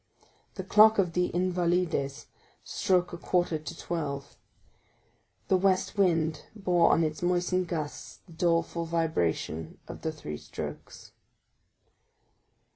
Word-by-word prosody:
The - - -4
clock 220 +1 +6
of 180 -4 +2
the 180 +1 +2
Invalides 175 -5 0 0.4
struck 180 -2 +1
a 170 - -6
quarter 175 -3 0
to 160 +2 -8
twelve; 140 -5 -4 1.1
the 190 - +4
west 190 0 +1
wind 165 -6 +2
bore 180 -5 +3
on 165 - +3
its 155 -1 -2
moistened 180 +1 +1
gusts 155 -4 -5
the 170 - -15
doleful 170 0 0
vibration 160 - -1
of - - -8
the 160 - -2
three 75 - -7
strokes. - - -8
170 Hz, 120 wpm, -28 LUFS, 160-180 Hz, 1.1 s, clock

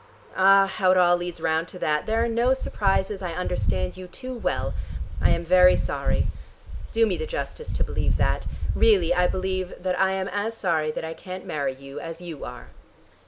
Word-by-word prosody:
Ah, 195 +1 +6
how 190 -1 0
it 185 - +5
all 175 -1 +5
leads 175 -1 -5
round 160 +1 0
to 180 - -9
that: 150 -3 0
there 225 +1 +2
are - - +1
no 235 +3 +2
surprises: 195 -4 0
I 175 -3 -3
understand 95 - -1
you 185 0 -8
too 255 +8 -7
well. 240 - -2 0.5
I - - +4
am 170 0 +1
very 180 +1 +6
sorry. - - 0 0.7
Do 225 0 +4
me 220 - -1
the 470 - -4
justice 470 -1 -5
to - - 0
believe - - 0
that. - - 0 0.3
Really 195 -7 +4
I 180 0 +3
believe 185 0 -2
that 185 -1 0
I 190 0 +3
am 190 0 -2
as 215 +3 -2
sorry 160 -6 +1
that 155 - -4
I 160 - -4
can't 185 +2 -8
marry 140 -3 -2
you 135 +1 -9
as 165 0 -7
you 170 -5 -8
are." - - -8
185 Hz, 200 wpm, -25 LUFS, 165-195 Hz, 0.7 s, Ah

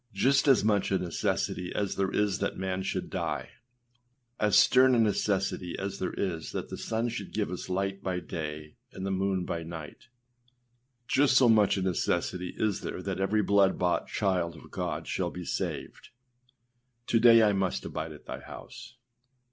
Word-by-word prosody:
Just 135 +8 +3
as 135 -7 +5
much 105 -2 +2
a 95 - +2
necessity 90 0 -2
as 100 -2 -1
there 95 -1 0
is 105 -3 0
that - - -2
man 95 0 -2
should 95 - -3
die, - - -3 0.9
as 105 -1 +4
stern 130 0 +6
a - - +3
necessity 100 -4 0
as 100 0 -4
there 95 - -2
is 85 -5 -3
that - - -4
the - - -6
sun 115 +2 -1
should 120 +1 -6
give 105 -4 -1
us 90 - -6
light 95 +1 -2
by 90 -2 -2
day 75 -3 -6
and 95 - -6
the 95 - -1
moon 95 -1 0
by 85 - -3
night, 80 +2 -9 1.0
just 135 -1 +4
so 130 - +6
much 105 -3 +4
a 95 - -1
necessity 90 0 -1
is 105 -3 0
there - - -5
that - - -3
every 105 +2 +1
blood 100 -1 +3
bought 90 -1 0
child 90 -4 0
of - - -14
God - - -3
shall - - -1
be 90 -1 -7
saved. - - -4 1.0
âTo 115 - +3
day 115 -1 +8
I 105 -1 +4
must 95 -9 -1
abide 80 0 -4
at 75 - -12
thy - - -6
house. 120 -1 -11
95 Hz, 180 wpm, -29 LUFS, 90-105 Hz, 1.0 s, day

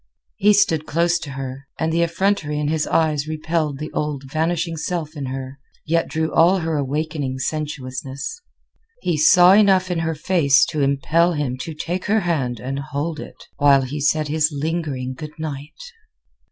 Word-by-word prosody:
He 210 +2 +5
stood 165 -6 +2
close 170 +2 +2
to 160 - -7
her, 135 +1 -6
and 160 0 -1
the 170 - +2
effrontery 170 -2 0
in 150 0 -1
his 155 -1 0
eyes 155 -2 +1
repelled 155 -2 -1
the 155 +2 -6
old, 150 -2 -3
vanishing 165 +3 -1
self 160 -1 -4
in 140 -3 -4
her, 130 +1 -6 0.3
yet 165 +1 +1
drew 160 0 -2
all 175 +4 +5
her 160 -1 -1
awakening 145 -1 -2
sensuousness. 140 - -4 0.6
He 170 - +1
saw 175 +4 +7
enough 190 -3 +4
in 175 - 0
her 160 0 -1
face 150 -4 +3
to 155 - -1
impel 150 +5 +2
him 145 -5 -2
to 155 +5 -6
take 175 +4 -3
her 215 +1 +2
hand 135 - -1
and 135 +5 -4
hold 145 +3 -4
it - - -10
while 140 -2 +5
he 145 +3 -4
said 155 +1 +2
his 155 +1 +1
lingering 145 -4 -3
good 150 +4 -9
night. 150 -2 -6
155 Hz, 170 wpm, -21 LUFS, 140-165 Hz, 0.6 s, saw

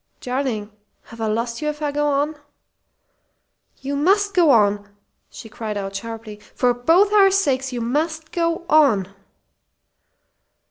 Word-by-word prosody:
"Darling! 250 -5 -3 0.3
Have 230 0 -12
I 220 - 0
lost 230 +3 -2
you 300 - -2
if 300 0 -3
I 295 - 0
go 295 +1 0
on?" 290 +2 0 1.5
"You 275 +1 -3
must 400 +7 +2
go 345 -4 +4
on!" 205 -4 +3 0.4
she - - -11
cried 215 -1 -6
out, 195 0 -5
sharply. 225 0 -7 0.2
"For 250 -1 +2
both 335 - +3
our 395 -2 +6
sakes 275 -9 0
you 245 -1 -4
must 310 +6 -2
go 335 +1 -1
on!" 225 - +3
270 Hz, 140 wpm, -21 LUFS, 225-315 Hz, 1.5 s, our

